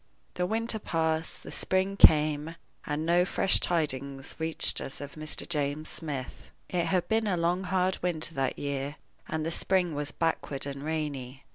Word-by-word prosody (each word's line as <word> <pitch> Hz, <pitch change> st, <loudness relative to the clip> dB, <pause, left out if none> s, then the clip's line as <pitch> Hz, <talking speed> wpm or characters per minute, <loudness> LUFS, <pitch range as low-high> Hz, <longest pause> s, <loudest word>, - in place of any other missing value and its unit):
The 180 Hz, 0 st, -1 dB
winter 225 Hz, +2 st, +1 dB
passed, 160 Hz, -3 st, -1 dB
the -, -, -8 dB
spring 190 Hz, +1 st, 0 dB
came, 155 Hz, -2 st, +5 dB, 0.3 s
and 150 Hz, +1 st, -1 dB
no 175 Hz, +1 st, +4 dB
fresh 185 Hz, +1 st, +3 dB
tidings 140 Hz, -5 st, -1 dB
reached 160 Hz, 0 st, +1 dB
us 135 Hz, -, -5 dB
of 145 Hz, -1 st, -7 dB
Mr. 155 Hz, 0 st, -3 dB
James 150 Hz, -1 st, 0 dB
Smith. 140 Hz, -6 st, -5 dB, 0.2 s
It 175 Hz, -2 st, 0 dB
had 180 Hz, +1 st, +1 dB
been 220 Hz, 0 st, +1 dB
a 185 Hz, -3 st, +1 dB
long, 175 Hz, +3 st, +1 dB
hard 185 Hz, 0 st, +1 dB
winter 165 Hz, -2 st, -1 dB
that 135 Hz, -3 st, -1 dB
year, 140 Hz, 0 st, -3 dB, 0.3 s
and 155 Hz, 0 st, -2 dB
the 165 Hz, -, -1 dB
spring 180 Hz, -1 st, +2 dB
was 145 Hz, 0 st, -3 dB
backward 160 Hz, -4 st, -1 dB
and 140 Hz, -1 st, -5 dB
rainy. 145 Hz, -4 st, -3 dB
160 Hz, 165 wpm, -29 LUFS, 145-180 Hz, 0.3 s, came